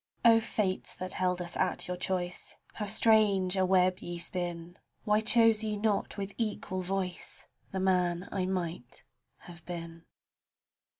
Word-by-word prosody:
O 225 -1 +8
Fates 205 -4 -2
that 185 0 -2
held 180 -1 0
us 175 - -6
at 185 - 0
your 180 - -2
choice, 180 0 -3 0.2
How 210 - -4
strange 205 -3 +4
a 190 -1 +2
web 185 -1 +3
ye 175 0 -6
spin 175 -1 -4
I - - -29 0.2
Why 210 0 +2
chose 225 -1 +5
ye 210 -1 -2
not 210 0 0
with 200 0 -4
equal 205 -4 -2
voice 185 -1 -3 0.2
The 190 - -3
man 180 -1 +1
I 185 -2 -1
might 170 -9 -4 0.4
have 170 -1 -12
been. 170 -1 -7
185 Hz, 155 wpm, -30 LUFS, 175-205 Hz, 0.4 s, O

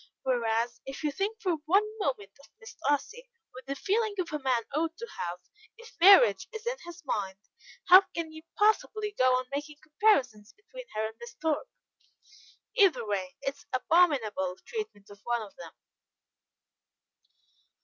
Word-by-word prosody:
Whereas, 235 -2 0
if 270 +3 -7
you 300 - +1
think 405 +8 -3
for 365 -7 0
one 390 +5 +5 0.2
moment 255 - -2
of 280 - -18
Miss 455 -1 -12
Darcy 470 - -2 0.2
with 255 +1 -12
the 275 - -3
feelings 420 +6 0
a 300 - -2
man 255 -4 0
ought 325 +3 -1
to 470 - -6
have, 175 0 -3 0.4
if 465 0 -14
marriage 400 +7 +7
is 445 -1 -8
in - - -2
his 345 0 -11
mind, 195 -7 -2 0.5
how 370 +2 +10
can 330 -2 -3
you 315 0 -10 0.2
possibly 430 0 +2
go 255 -5 +4
on 255 0 -1
making 295 +1 -4
comparisons 280 - +1
between - - -12
her 215 0 0
and 220 +1 -7
Miss 235 0 -10
Thorpe? 320 - -2 1.1
Either 365 - +4
way, 190 -3 -3
it 275 - -2
is - - -20
abominable 255 - +2
treatment 425 - -6
of 205 - -15
one 240 -1 -1
of 200 - -13
them." 165 -2 -10
295 Hz, 160 wpm, -29 LUFS, -, 1.1 s, how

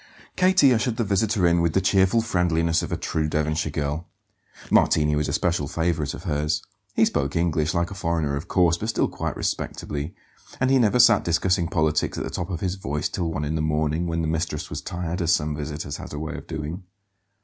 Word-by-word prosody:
Katie 185 -8 +5
ushered 115 0 0
the 115 - +1
visitor 100 -1 +1
in 85 0 +4
with 85 -2 +1
the - - +3
cheerful 95 +4 +3
friendliness 85 -5 +1
of - - -5
a - - -1
true 80 -1 -1
Devonshire 75 +1 -1
girl. 75 +2 -3 0.6
Martini 75 -1 +4
was 75 0 0
a - - -1
special 85 -5 0
favourite 80 -2 -1
of - - -10
hers. 75 +2 -1 0.3
He - - +5
spoke 70 - -1
English, 80 -1 +1
like 85 +2 0
a - - -4
foreigner, 85 -6 -1
of 70 +6 -5
course, 85 -2 +3
but 110 - -3
still 115 - +1
quite - - -4
respectably; 75 +3 -3 0.4
and 130 +1 +2
he 135 - +5
never 115 0 +3
sat 120 - +6
discussing 85 +1 +1
politics 80 -3 0
at - - -2
the - - -5
top 90 +1 -4
of 90 -4 -4
his 90 -2 -1
voice 75 -4 -2
till 85 -3 -2
one 75 -1 -2
in 75 - -2
the 80 - -1
morning, 80 +2 0
when 85 0 -1
the - - -1
mistress 80 -1 -2
was - - -4
tired, 90 0 -4
as 85 -1 +2
some 75 0 0
visitors 75 0 -5
had - - -9
a - - -4
way 80 +2 -4
of - - -9
doing. 80 +3 -5
85 Hz, 215 wpm, -24 LUFS, 75-90 Hz, 0.6 s, sat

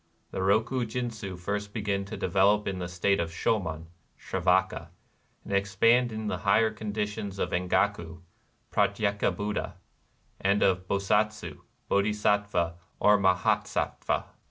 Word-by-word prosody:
The - - -3
Roku 110 +6 +2
jindzii 110 -5 -4
first 105 +3 -4
begin 100 -2 -1
to 100 - -7
develop 100 +3 +2
in 95 -2 -2
the 90 - -3
state 90 +3 +1
of 85 -1 -1
Shomon 80 -2 -1 0.3
(Sravaka), - - 0 0.6
and - - -6
ex 100 0 0
pand 120 +4 +4
in 110 0 -5
the - - -2
higher 110 +2 +3
conditions 105 -1 -4
of - - -2
Engaku 90 -2 0 0.5
(Pratyeka 100 0 +1
Buddha) 105 0 -3 0.6
and 100 +2 +2
of 95 -1 +2
Bosatsu 100 -4 0 0.3
(Bodhi 100 +2 +2
sattva 105 -5 0 0.2
or 105 0 +5
Mahasattva). 95 -2 +1
100 Hz, 130 wpm, -28 LUFS, 95-105 Hz, 0.6 s, or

